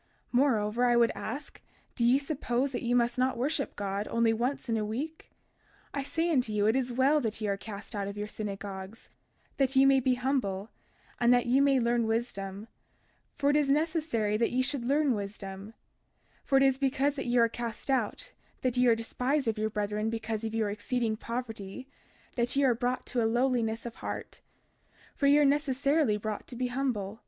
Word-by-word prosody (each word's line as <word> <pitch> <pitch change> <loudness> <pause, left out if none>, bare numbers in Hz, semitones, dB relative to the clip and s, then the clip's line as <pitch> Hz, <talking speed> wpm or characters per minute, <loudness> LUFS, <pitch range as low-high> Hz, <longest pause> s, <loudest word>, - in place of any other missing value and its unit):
32:11 - - -40 0.2
Moreover, 240 -3 +2
I 240 -1 +4
would 235 -1 +4
ask, 280 +6 -6 0.3
do 235 - -1
ye 245 +3 +5
suppose 275 -2 -1
that 250 - -3
ye 240 +1 +1
must 240 0 +1
not 255 +1 +1
worship 280 +3 -1
God 200 +1 -3
only 230 -1 +2
once 250 +4 -2
in 230 - 0
a 215 - 0
week? 275 +10 -5 0.6
32:12 285 - -2
I - - -2
say 325 +5 -1
unto 255 -7 +1
you, 210 -1 +1
it 220 +3 +3
is 255 -2 0
well 265 +5 +3
that 225 -3 -3
ye 215 - -2
are 200 - +1
cast 205 +2 -9
out 200 -2 -2
of 200 +1 -6
your 210 0 -3
synagogues, 200 0 -6 0.5
that 270 -1 +1
ye 265 +1 +6
may 270 0 +6
be 255 0 +2
humble, 235 -6 -1 0.5
and 240 0 +4
that 245 -1 +4
ye 255 +3 +3
may 275 -1 +4
learn 235 -1 +1
wisdom; 210 -3 -3 0.7
for 285 0 +2
it - - +1
is 295 -2 +2
necessary 295 -8 +1
that 230 - +2
ye 255 +1 +1
should 275 -1 -1
learn 285 +1 +2
wisdom; 200 0 -6 0.7
for 270 - +3
it 270 - +5
is 270 -1 +3
because 275 +1 +1
that 275 -3 -5
ye 245 +1 +2
are 230 -1 +6
cast 235 +3 -5
out, 260 - -1 0.3
that 255 -1 0
ye 250 0 +4
are 230 - +6
despised 250 +4 -1
of 220 -1 0
your 215 0 0
brethren 210 +1 -1
because 225 -1 -3
of 225 0 -3
your 215 -2 0
exceeding 230 +1 -1
poverty, 230 0 -6 0.5
that 240 0 0
ye 280 - +3
are 260 -3 +5
brought 245 +2 -2
to 245 - -1
a 225 - +2
lowliness 240 -2 0
of 235 - -7
heart; - - -6 0.7
for 280 - +1
ye 285 +1 +6
are 295 - +5
necessarily 280 -3 +2
brought 210 0 -5
to 250 - -9
be 250 +1 -1
humble. 235 -6 -2
240 Hz, 205 wpm, -29 LUFS, 215-270 Hz, 0.7 s, ye